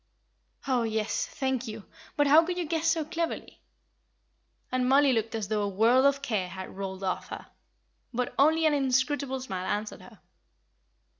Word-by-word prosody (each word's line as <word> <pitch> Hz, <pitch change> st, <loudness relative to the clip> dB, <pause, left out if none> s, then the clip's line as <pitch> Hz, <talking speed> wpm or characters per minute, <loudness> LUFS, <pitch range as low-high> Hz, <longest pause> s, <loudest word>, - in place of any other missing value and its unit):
"Oh, 255 Hz, -2 st, +2 dB
yes. 220 Hz, -1 st, -1 dB
Thank 265 Hz, -2 st, -2 dB
you; 220 Hz, -2 st, -7 dB, 0.3 s
but 290 Hz, -, +4 dB
how 300 Hz, +3 st, +7 dB
could 355 Hz, +1 st, -3 dB
you 355 Hz, -, -1 dB
guess 325 Hz, +1 st, -1 dB
so 320 Hz, -2 st, +1 dB
cleverly?" 330 Hz, +2 st, -4 dB, 1.1 s
and 255 Hz, 0 st, +1 dB
Mollie 275 Hz, 0 st, +5 dB
looked 225 Hz, 0 st, -1 dB
as 215 Hz, -3 st, -3 dB
though 210 Hz, 0 st, 0 dB
a 205 Hz, -, 0 dB
world 235 Hz, +7 st, +4 dB
of 280 Hz, 0 st, 0 dB
care 205 Hz, -9 st, -1 dB
had 190 Hz, +1 st, -8 dB
rolled 190 Hz, 0 st, -5 dB
off 185 Hz, -1 st, -2 dB
her. -, -, -8 dB, 0.7 s
But 250 Hz, 0 st, -2 dB
only 320 Hz, +3 st, +4 dB
an 310 Hz, -, +4 dB
inscrutable 265 Hz, 0 st, 0 dB
smile 185 Hz, -7 st, -5 dB
answered 210 Hz, +1 st, -3 dB
her. -, -, -15 dB
255 Hz, 165 wpm, -28 LUFS, 215-290 Hz, 1.1 s, how